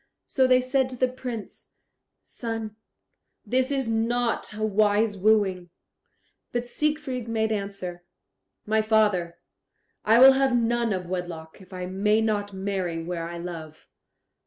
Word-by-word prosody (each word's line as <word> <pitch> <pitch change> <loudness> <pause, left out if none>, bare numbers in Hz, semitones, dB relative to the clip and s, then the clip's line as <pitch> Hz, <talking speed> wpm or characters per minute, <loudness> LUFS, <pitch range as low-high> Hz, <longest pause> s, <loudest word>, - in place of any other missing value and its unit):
So 260 -2 +2
they 255 0 +5
said 260 0 +1
to 255 - -7
the 255 +1 +2
Prince, 250 -4 -8 0.5
"Son, 225 -2 -6 0.7
this 255 +4 +1
is 270 -3 -1
not 230 +1 0
a 215 0 -2
wise 210 0 +2
wooing." 195 -3 +2 0.8
But 240 0 -2
Siegfried 275 -3 -2
made 220 -1 0
answer, 195 -4 -4 0.6
"My 220 +1 +2
father, 210 -6 +1 0.7
I 220 +2 +5
will 265 +2 +9
have 265 -2 +2
none 235 0 +1
of 185 -2 -2
wedlock, 175 -1 -6
if 185 - -17
I 180 -1 -5
may 200 +4 +1
not 210 -2 -1
marry 190 -4 -3
where 170 -1 -4
I 170 - -6
love." 165 -3 -8
215 Hz, 135 wpm, -25 LUFS, 185-240 Hz, 0.8 s, will